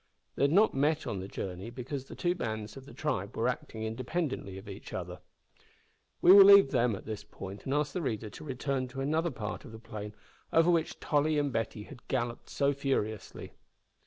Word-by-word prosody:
They 140 Hz, -, +3 dB
had 140 Hz, -, +2 dB
not 205 Hz, +6 st, +5 dB
met 150 Hz, +3 st, +1 dB
on 100 Hz, -, -3 dB
the 95 Hz, -, -5 dB
journey, 95 Hz, +1 st, -5 dB
because 130 Hz, +3 st, -5 dB
the -, -, -10 dB
two 175 Hz, -1 st, +1 dB
bands 110 Hz, -, -4 dB
of 135 Hz, -, -10 dB
the -, -, -11 dB
tribe -, -, -2 dB
were -, -, +1 dB
acting 110 Hz, -, -3 dB
independently 125 Hz, -, -3 dB
of 95 Hz, +2 st, -11 dB
each 100 Hz, 0 st, -9 dB
other. 90 Hz, 0 st, -5 dB, 1.0 s
We 180 Hz, -, +9 dB
will 200 Hz, -1 st, +11 dB
leave 200 Hz, -7 st, +8 dB
them 120 Hz, -4 st, +2 dB
at -, -, -10 dB
this 105 Hz, -1 st, -5 dB
point 100 Hz, -1 st, -9 dB
and 135 Hz, -, -1 dB
ask 150 Hz, -1 st, 0 dB
the 180 Hz, -, -2 dB
reader 110 Hz, -7 st, -3 dB
to -, -, -10 dB
return 135 Hz, -1 st, -2 dB
to 135 Hz, +2 st, -6 dB
another 160 Hz, +5 st, +1 dB
part 105 Hz, -8 st, -5 dB
of -, -, -11 dB
the 110 Hz, -, -9 dB
plain 105 Hz, -2 st, -8 dB, 0.4 s
over 165 Hz, +2 st, +5 dB
which 165 Hz, -2 st, 0 dB
Tolly 150 Hz, +1 st, +1 dB
and 145 Hz, -3 st, 0 dB
Betty 110 Hz, -1 st, -2 dB
had 125 Hz, +2 st, -13 dB
galloped 120 Hz, -2 st, -2 dB
so 140 Hz, 0 st, +1 dB
furiously. 130 Hz, -7 st, -3 dB
130 Hz, 205 wpm, -31 LUFS, 105-150 Hz, 1.0 s, will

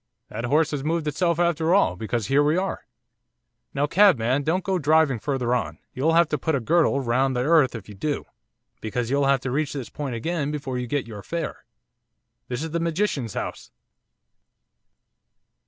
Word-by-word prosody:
That 115 Hz, +3 st, -4 dB
horse 150 Hz, +5 st, +2 dB
has 145 Hz, -3 st, -3 dB
moved 160 Hz, 0 st, -1 dB
itself 170 Hz, +3 st, +1 dB
after 170 Hz, 0 st, +2 dB
all, 200 Hz, -, +3 dB
because 110 Hz, +3 st, -2 dB
here 135 Hz, +4 st, +3 dB
we 150 Hz, +3 st, +2 dB
are. 190 Hz, +1 st, -3 dB, 0.8 s
Now, 140 Hz, +1 st, 0 dB
cabman, 145 Hz, -, +4 dB
don't 165 Hz, +6 st, 0 dB
go 190 Hz, 0 st, 0 dB
driving 150 Hz, -4 st, +3 dB
further 125 Hz, -2 st, -1 dB
on, 80 Hz, -11 st, -2 dB, 0.2 s
you'll 155 Hz, +6 st, +1 dB
have 170 Hz, 0 st, +5 dB
to 150 Hz, -, -1 dB
put 160 Hz, +2 st, 0 dB
a -, -, +1 dB
girdle 155 Hz, +2 st, +2 dB
round 130 Hz, +2 st, +1 dB
the 125 Hz, -, 0 dB
earth 150 Hz, -4 st, +4 dB
if 110 Hz, -4 st, -8 dB
you 105 Hz, -, -10 dB
do; 145 Hz, +9 st, -3 dB, 0.6 s
because 115 Hz, +2 st, -3 dB
you'll 140 Hz, 0 st, +2 dB
have 135 Hz, -2 st, +3 dB
to 130 Hz, -, -3 dB
reach 145 Hz, +2 st, -1 dB
this 135 Hz, -5 st, -5 dB
point 140 Hz, -5 st, -4 dB
again 150 Hz, +4 st, -2 dB
before 140 Hz, -4 st, -3 dB
you 125 Hz, -, -4 dB
get 145 Hz, +1 st, -1 dB
your 110 Hz, -3 st, -8 dB
fare. 170 Hz, +10 st, -5 dB, 0.8 s
This 125 Hz, +4 st, -3 dB
is 160 Hz, -, -5 dB
the 170 Hz, -, -1 dB
magician's 165 Hz, -, -1 dB
house! -, -, -5 dB
145 Hz, 185 wpm, -24 LUFS, 125-160 Hz, 0.8 s, have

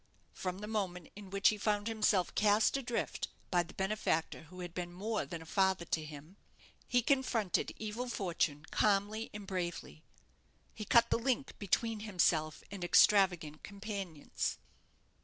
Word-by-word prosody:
From 185 Hz, -1 st, -4 dB
the 210 Hz, +2 st, -6 dB
moment 185 Hz, -6 st, -3 dB
in 205 Hz, -2 st, -10 dB
which 195 Hz, 0 st, +4 dB
he 215 Hz, -, -2 dB
found 205 Hz, 0 st, +1 dB
himself 210 Hz, -5 st, +2 dB
cast 210 Hz, +3 st, +4 dB
adrift 245 Hz, -3 st, -2 dB, 0.2 s
by 175 Hz, -2 st, +4 dB
the 175 Hz, -, -9 dB
benefactor 190 Hz, -5 st, -1 dB
who 180 Hz, +4 st, -10 dB
had 175 Hz, -1 st, -6 dB
been 175 Hz, -1 st, -4 dB
more 210 Hz, +5 st, -2 dB
than 170 Hz, -2 st, -6 dB
a -, -, -15 dB
father 190 Hz, 0 st, +1 dB
to 160 Hz, -1 st, -1 dB
him, 155 Hz, +5 st, -10 dB, 0.5 s
he 245 Hz, -1 st, +2 dB
confronted 235 Hz, -8 st, +1 dB
evil 220 Hz, +3 st, -4 dB
fortune 165 Hz, -8 st, -1 dB
calmly 210 Hz, +2 st, +1 dB
and 210 Hz, -1 st, -8 dB
bravely. 175 Hz, -4 st, -4 dB, 0.7 s
He 215 Hz, -, -6 dB
cut 235 Hz, +3 st, +5 dB
the -, -, +3 dB
link 265 Hz, +2 st, 0 dB
between 220 Hz, +3 st, 0 dB
himself 175 Hz, -7 st, +1 dB
and 200 Hz, -3 st, -6 dB
extravagant 175 Hz, -5 st, +4 dB
companions. 200 Hz, -6 st, -4 dB
195 Hz, 150 wpm, -34 LUFS, 175-215 Hz, 0.7 s, cut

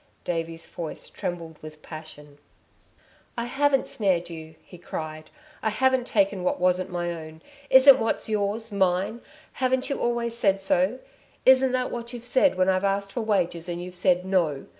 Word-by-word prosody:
Davey's 165 Hz, -1 st, -4 dB
voice 165 Hz, -2 st, -7 dB
trembled 165 Hz, -3 st, -5 dB
with 155 Hz, 0 st, -11 dB
passion. 150 Hz, -2 st, -10 dB, 1.0 s
"I 235 Hz, -, -1 dB
haven't 270 Hz, +2 st, +1 dB
snared 180 Hz, -5 st, 0 dB
you!" 160 Hz, -1 st, -9 dB
he 180 Hz, -, -14 dB
cried, 155 Hz, -2 st, -6 dB, 0.3 s
"I 220 Hz, -, +1 dB
haven't 255 Hz, +3 st, +1 dB
taken 200 Hz, -3 st, +1 dB
what 180 Hz, -, 0 dB
wasn't 180 Hz, +1 st, +1 dB
my 175 Hz, -1 st, -2 dB
own. 160 Hz, -1 st, -10 dB, 0.3 s
Isn't 265 Hz, +1 st, +8 dB
what's 225 Hz, -, -1 dB
yours, 215 Hz, +1 st, -1 dB
mine? 190 Hz, +3 st, 0 dB, 0.3 s
Haven't 260 Hz, +1 st, 0 dB
you 275 Hz, -, -2 dB
always 235 Hz, -1 st, -1 dB
said 195 Hz, -4 st, +2 dB
so? 190 Hz, +4 st, +1 dB, 0.5 s
Isn't 260 Hz, 0 st, +6 dB
that 255 Hz, 0 st, 0 dB
what 235 Hz, 0 st, -6 dB
you've 240 Hz, -1 st, -7 dB
said 260 Hz, 0 st, +3 dB
when 185 Hz, 0 st, +2 dB
I've 190 Hz, 0 st, +2 dB
asked 200 Hz, 0 st, 0 dB
for 235 Hz, -, -3 dB
wages 180 Hz, -5 st, 0 dB
and 175 Hz, 0 st, -3 dB
you've 180 Hz, +1 st, -7 dB
said: 180 Hz, 0 st, +1 dB
'No!' 170 Hz, -7 st, 0 dB
190 Hz, 165 wpm, -25 LUFS, 170-235 Hz, 1.0 s, Isn't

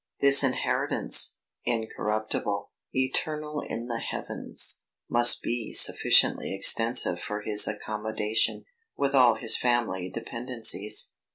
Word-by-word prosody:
This 140 Hz, 0 st, +6 dB
inheritance, 130 Hz, -2 st, 0 dB, 0.3 s
incorruptible, 110 Hz, -3 st, -4 dB, 0.2 s
eternal 150 Hz, +3 st, -2 dB
in 115 Hz, +1 st, -7 dB
the 120 Hz, -1 st, -6 dB
heavens, -, -, -1 dB, 0.2 s
must 120 Hz, 0 st, +5 dB
be 120 Hz, -2 st, -5 dB
sufficiently -, -, +3 dB
extensive 105 Hz, -3 st, +2 dB
for 105 Hz, 0 st, -6 dB
his 105 Hz, -1 st, +5 dB
accommodation, 105 Hz, +1 st, -3 dB, 0.3 s
with 140 Hz, 0 st, -2 dB
all 125 Hz, -4 st, +4 dB
his 110 Hz, 0 st, +2 dB
family 115 Hz, -7 st, -2 dB
dependencies. 115 Hz, -1 st, -2 dB
115 Hz, 100 wpm, -25 LUFS, 105-125 Hz, 0.3 s, This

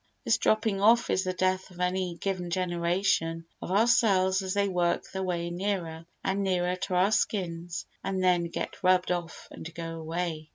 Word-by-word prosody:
This -, -, +3 dB
dropping 215 Hz, -2 st, +1 dB
off 235 Hz, +3 st, +5 dB
is 190 Hz, -, +2 dB
the 185 Hz, -, -1 dB
death 185 Hz, +1 st, 0 dB
of 180 Hz, -1 st, -15 dB
any 180 Hz, -1 st, 0 dB
given 185 Hz, -3 st, -2 dB
generation 175 Hz, -1 st, 0 dB, 0.2 s
of -, -, -6 dB
our 205 Hz, +4 st, +4 dB
cells 195 Hz, -5 st, +3 dB
as 190 Hz, 0 st, -3 dB
they 200 Hz, 0 st, +2 dB
work 175 Hz, -2 st, +1 dB
their 190 Hz, -, -3 dB
way 175 Hz, -2 st, -2 dB
nearer 175 Hz, -3 st, -3 dB, 0.2 s
and 195 Hz, +1 st, 0 dB
nearer 180 Hz, -2 st, +1 dB
to 185 Hz, 0 st, -3 dB
our 185 Hz, +3 st, +4 dB
skins 175 Hz, -5 st, -1 dB, 0.2 s
and 190 Hz, -1 st, -1 dB
then 180 Hz, -2 st, +3 dB
get 170 Hz, -, -5 dB
rubbed 185 Hz, -1 st, +3 dB
off 175 Hz, -2 st, -4 dB
and 165 Hz, -, -8 dB
go 165 Hz, -1 st, -5 dB
away. 160 Hz, -1 st, -3 dB
180 Hz, 180 wpm, -28 LUFS, 170-190 Hz, 0.2 s, off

